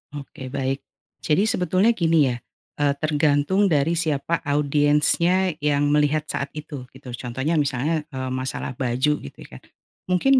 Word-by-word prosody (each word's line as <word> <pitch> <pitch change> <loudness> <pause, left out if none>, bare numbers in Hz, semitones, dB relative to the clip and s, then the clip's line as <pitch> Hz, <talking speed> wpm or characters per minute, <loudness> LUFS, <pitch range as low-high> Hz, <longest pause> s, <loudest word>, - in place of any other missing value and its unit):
Oke 135 -2 -8
baik, 135 0 -2 0.4
jadi 165 +6 +2
sebetulnya 185 +1 +2
gini 165 - +3
ya, 120 - -4 0.4
eee, 145 -1 +3
tergantung 155 +6 +2
dari 150 -1 +2
siapa 160 -1 0
audiensnya 150 +6 +2
yang 145 -1 +1
melihat 150 +1 +2
saat 140 -2 -3
itu 145 -4 -7
gitu 130 -2 -10
contohnya 130 +6 -2
misalnya, 150 +3 -1
eee, 130 -3 -5
masalah 130 +1 -3
baju 130 +3 0
gitu 70 - -11
ya, 65 - -12 0.5
mungkin 260 +9 +4
145 Hz, 140 wpm, -23 LUFS, 135-165 Hz, 0.5 s, mungkin